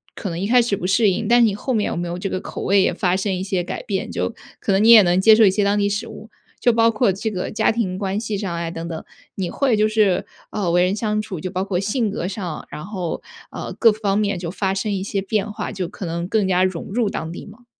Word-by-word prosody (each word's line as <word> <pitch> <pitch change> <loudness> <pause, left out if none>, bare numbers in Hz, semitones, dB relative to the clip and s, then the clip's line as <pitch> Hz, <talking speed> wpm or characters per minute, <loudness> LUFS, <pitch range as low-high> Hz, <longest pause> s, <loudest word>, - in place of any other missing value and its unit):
可 200 - -5
能 170 0 -4
一 195 - -1
开 245 +2 +5
始 230 -4 0
不 180 -1 -4
适 205 +2 +4
应， 215 +4 -2
但 240 +2 +5
是 235 - +6
你 215 - +1
后 255 +5 -3
面 215 -3 +1
有 - - -3
没 175 0 -3
有 170 +1 -4
这 195 - -3
个 185 - -2
口 - - -6
味 195 0 +4
也 - - +2
发 180 -1 +1
生 190 +1 -1
一 185 - -3
些 190 -2 -1
改 - - -5
变？ 195 -2 -3
就 - - -2 0.3
可 - - -1
能 195 +2 +3
你 225 - +5
也 230 -2 +10
能 175 +1 +2
接 220 +2 +7
受 220 0 +6
一 195 - +5
些 205 +2 +1
当 200 +1 +2
地 200 0 +2
食 205 +2 -2
物， 220 0 -11 0.3
就 240 - +3
包 230 0 +4
括 225 -2 +2
这 200 +4 -3
个 180 -3 -4
家 - - +2
庭 220 -5 -1
关 195 0 -1
系 215 -1 -3
上 190 -4 -3
啊 170 0 -3
等 165 0 -6
等， 160 -2 -6 0.3
你 185 -3 -3
会 265 -6 +1
就 215 +1 +3
是， 215 -4 +2 0.3
呃， 195 -5 -1
为 175 +1 +4
人 185 +2 +1
相 215 0 -1
处 195 -5 -6
就 180 +3 -5
包 185 0 -1
括 195 -2 -1
性 215 +3 0
格 180 -3 -3
上， 185 -5 -5
然 150 - -7
后， 185 -5 -4 0.3
呃， - - -6
各 230 - +5
方 205 -2 -1
面 200 -3 0
就 175 -2 -4
发 190 0 -1
生 195 +2 -2
一 190 -1 -2
些 195 0 -2
变 210 +1 -1
化， 210 0 -4
就 185 -4 -3
可 195 0 -8
能 170 +1 -3
更 205 0 +1
加 185 -1 +3
融 185 -3 -2
入 220 +1 0
当 160 +1 -4
地 170 - -8
吗？ 225 +4 -15
200 Hz, 310 characters per minute, -21 LUFS, 185-215 Hz, 0.3 s, 也